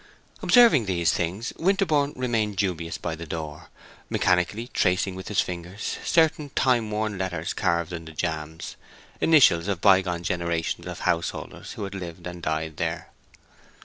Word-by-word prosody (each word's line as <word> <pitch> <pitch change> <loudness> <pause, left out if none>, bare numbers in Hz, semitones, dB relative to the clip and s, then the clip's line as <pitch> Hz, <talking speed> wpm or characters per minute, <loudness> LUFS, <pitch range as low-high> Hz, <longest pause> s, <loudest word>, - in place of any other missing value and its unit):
Observing 230 - +6
these 85 -3 +2
things, 95 +8 -2
Winterborne 160 -6 +2
remained 115 -5 0
dubious 90 -4 -2
by 85 - -4
the 80 +1 -7
door, 75 -1 -6 0.4
mechanically 90 +6 +1
tracing 90 +1 +1
with 95 +1 -8
his 105 - +2
fingers 90 +3 -5
certain 160 -3 +2
time 120 -5 +2
worn 105 -2 -2
letters 85 -4 -2
carved 85 +1 0
in 85 -1 -6
the 80 - -9
jambs—initials 85 - +1
of 100 -4 -1
by 95 0 +6
gone 90 -2 -4
generations 85 -3 -2
of - - -6
householders 85 -1 -2
who - - -6
had 100 0 -5
lived 90 -2 -7
and 90 -1 -7
died 80 -1 -2
there. - - -3
90 Hz, 145 wpm, -25 LUFS, 85-110 Hz, 0.4 s, Observing